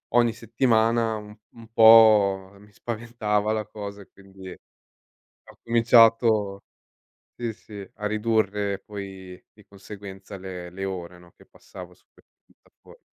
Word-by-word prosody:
ogni 120 -2 +3
settimana, 115 -1 0
u 105 0 -12 0.2
un 115 -1 -15
po' 105 -4 +6
mi 105 +1 -19
spaventava 110 -2 -3
la 110 -1 -3
cosa 100 -1 -8
e 100 - -17
quindi 95 -1 -14
ho - - -16 0.8
cominciato, 115 -3 +3 0.8
sì, 120 -2 -4
sì, 100 -3 -12
a 105 - -7
ridurre 105 -2 -1
poi 95 -3 -10
di 105 - -20
conseguenza 100 0 -11
le 90 -2 -8
le 95 +1 -7
ore, 90 -2 -6
no, 90 0 -19
che - - -20
passavo - - -13
su - - -29
queste - - -27 0.2
piattafor - - -22
105 Hz, 135 wpm, -24 LUFS, 95-115 Hz, 0.8 s, po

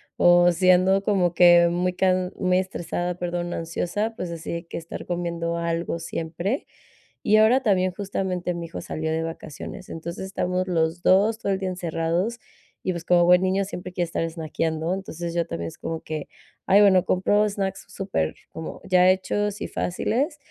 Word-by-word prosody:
o 175 0 +5
si 185 +2 +2
ando 190 +2 +4
como 185 -5 +2
que 175 0 +7
muy 180 +1 0
can 185 0 +1
muy 185 -1 +2
estresada, 175 -1 -3
perdón, 175 0 -3
ansiosa, 175 +7 -2
pues 180 -5 -5
así 165 0 -5
de 170 +1 -5
que - - -6
estar 165 0 -7
comiendo 170 -1 -2
algo 170 0 -2
siempre. 170 - -3 0.6
Y 215 - +6
ahora 225 +5 +5
también, 185 -4 +2
justamente, 185 -2 -3
mi 170 -1 -5
hijo 165 - -7
salió 160 0 -4
de 160 +1 -1
vacaciones. 165 +1 -7
Entonces, 170 +3 -6
estamos 185 -1 -1
los 165 -1 0
2 210 +4 +4
todo 200 - -1
el 195 - +1
día 190 - -2
encerrados, 175 +5 -1 0.4
y, 185 - 0
pues, 170 -1 -6
como 175 -1 +4
buen 180 +1 +6
niño 190 +1 +1
siempre 185 -2 -7
quiere 180 -1 0
estar 165 0 -2
snackeando. 160 +1 -2
Entonces, 175 -3 -5
yo 170 -1 0
también 85 0 -4
es - - -14
como 165 -1 -4
que 155 -2 -5 0.4
"Ay, 200 +2 +6
bueno", 190 -3 +6
compro 205 +3 +2
snacks 195 -1 -3
super, 190 - -2 0.2
como 160 - -7
ya 185 -1 +5
hechos 205 +2 -1
y - - -2
fáciles, 265 - -1
180 Hz, 180 wpm, -24 LUFS, 170-190 Hz, 0.6 s, que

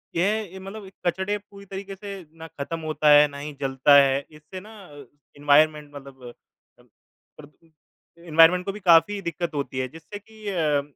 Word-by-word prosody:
ये 200 +2 -1
अ, - - -8
मतलब 195 +1 -10 0.2
कचरे 190 +4 -1
पूरी 200 -1 -16
तरीके 195 0 -8
से 195 -2 -9
ना 160 - -9
खत्म 160 +1 -6
होता 155 -1 0
है, 150 0 +7
ना 140 -1 -11
ही 145 +1 -7
जलता 135 +1 +3
है, 140 0 +4
इससे 155 +5 -11
ना 210 - -14 0.2
अ, 145 -2 -13 0.3
एनवायरमेंट 150 +1 +2
मतलब 135 -2 -12
अ, 120 - -10 1.0
प्रद 155 +2 -18 0.5
एनवायरमेंट 170 +2 +4
को 200 - -2
भी 210 - -10
काफ़ी 190 +2 +4
दिक्कत 170 -2 -4
होती 140 -2 -4
है 130 - -2
जिससे 165 +9 -11
कि 215 +1 -14
अ, 155 -6 0
165 Hz, 175 wpm, -24 LUFS, 145-195 Hz, 1.0 s, है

